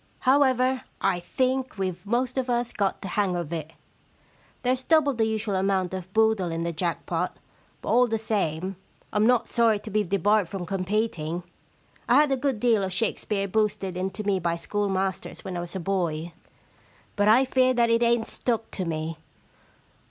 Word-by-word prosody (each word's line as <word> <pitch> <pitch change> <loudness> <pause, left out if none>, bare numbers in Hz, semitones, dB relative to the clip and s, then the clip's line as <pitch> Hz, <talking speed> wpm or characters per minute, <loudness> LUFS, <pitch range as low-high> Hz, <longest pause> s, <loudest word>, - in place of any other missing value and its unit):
However, 260 -1 +3 0.2
I 190 -2 +1
think 255 +7 -1
weVe 185 0 -3
most 250 +3 0
of 255 -1 -3
us 240 0 0
got 200 -2 -1
the 195 - -4
hang 195 -1 0
of 170 -2 -3
it. 160 -1 -5 0.9
There's 255 +1 +1
double 310 -3 +4
the 225 -2 +1
usual 220 -1 -1
amount 190 -1 0
of 185 -1 -6
boodle 220 -4 +2
in 165 0 -2
the 170 0 -2
jack 170 +1 -2
pot, 175 +1 -2 0.5
but - - -4
all 250 +1 +5
the 225 -1 0
same 195 -4 -2 0.4
Fm 210 +1 +3
not 245 -1 +3
sorry 230 -3 +3
to 210 +1 -9
be 210 +1 +2
debarred 200 0 +2
from 190 -3 -5
competing. 185 -3 -2 0.7
I - - +6
had 295 -1 +5
a - - +4
good 265 -3 -1
deal 230 -2 +3
of 190 - -2
Shakespeare 200 0 -1
boosted 205 -2 0
into 190 +3 -3
me 200 -2 +1
by 170 -1 0
schoolmasters 195 +1 -2
when 185 -2 -4
I - - -2
was 175 +1 -6
a - - -2
boy, 170 -3 -2 0.8
but 205 0 +2
I 240 +5 +6
fear 255 0 +3
that 235 -1 +3
it 230 0 +3
ain*t 235 -1 +3
stuck 230 -2 -2
to 185 - -3
me. 160 0 -3
205 Hz, 180 wpm, -26 LUFS, 180-235 Hz, 0.9 s, I